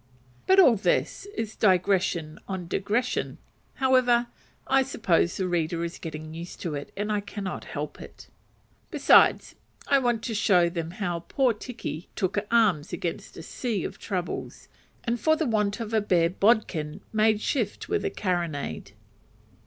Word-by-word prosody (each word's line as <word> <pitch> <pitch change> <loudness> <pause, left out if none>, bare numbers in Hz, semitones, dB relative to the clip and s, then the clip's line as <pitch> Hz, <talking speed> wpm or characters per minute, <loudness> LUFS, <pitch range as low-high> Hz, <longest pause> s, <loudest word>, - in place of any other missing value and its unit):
But 380 +1 +6
all 260 - +7
this 220 - 0
is 220 - -4
digression 180 -5 +1
on 190 -3 -4
digression: 215 +8 -1 0.4
however, 250 -3 +3 0.4
I 270 0 +4
suppose 185 -9 +1
the 190 - -1
reader 170 -1 -1
is 170 +1 -5
getting 155 -1 -7
used 170 +2 -8
to 165 - -3
it, 145 -1 -6
and 210 +1 -2
I 210 - +1
cannot 200 -2 -6
help 150 0 -6
it. - - -12 0.6
Besides, - - +5 0.3
I 275 - +4
wanted 240 -3 0
to 230 - -3
show 185 -5 +3
them 165 -2 -4
how 175 -1 -3
poor 260 -4 +2
Tiki 210 - -7
"took 195 0 0
arms 210 -10 +3
against 170 - -5
a 165 - -8
sea 220 -1 -3
of - - -6
troubles," 180 -4 -5 0.4
and 235 0 -1
for 315 +5 +3
the 315 - -1
want 210 -3 0
of 225 -1 -5
a 220 - +3
"bare 175 -4 +2
bodkin" 190 -7 +1
made 215 -1 +3
shift 220 -2 -2
with - - -1
a - - 0
carronade. 170 - -3
200 Hz, 155 wpm, -26 LUFS, 170-230 Hz, 0.6 s, all